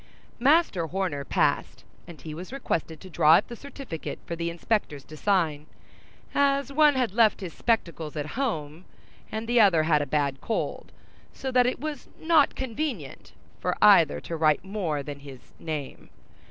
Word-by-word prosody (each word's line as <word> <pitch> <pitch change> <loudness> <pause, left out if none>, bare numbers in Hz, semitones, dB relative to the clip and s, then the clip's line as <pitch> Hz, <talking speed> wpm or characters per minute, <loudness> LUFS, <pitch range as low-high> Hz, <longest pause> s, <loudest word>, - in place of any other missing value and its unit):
Master 265 - +3
Horner 175 -5 -2
passed, - - 0 0.2
and 170 -3 -11
he 155 - -8
was 180 +7 -8
requested 165 - -3
to 190 - -11
draw 155 +1 +6
up - - +1
the 240 - -6
certificate 270 - -7
for 170 - -4
the 170 0 -2
inspectors 170 -4 -2
to 155 - -12
sign, 155 -5 0 0.7
as 280 0 +1
one 300 -1 +5
had 250 -7 0
left 220 -2 +3
his 180 -4 -6
spectacles 170 -9 -1
at 150 -1 -3
home, 175 - -3 0.5
and 220 +1 -4
the 240 0 +4
other 175 -7 +5
had 155 -2 +3
a 145 - -3
bad 140 -1 -1
cold, 225 - -3 0.4
so 265 - -5
that 250 -1 +4
it 250 - -2
was 295 -1 -6
not 320 -3 +3
convenient 250 - -5 0.3
for - - -2
either 75 - +6
to 165 - -5
write 155 +1 +2
more 180 -8 -2
than 145 0 -7
his 140 -3 -13
name. 150 -4 -6
180 Hz, 165 wpm, -26 LUFS, 155-250 Hz, 0.7 s, draw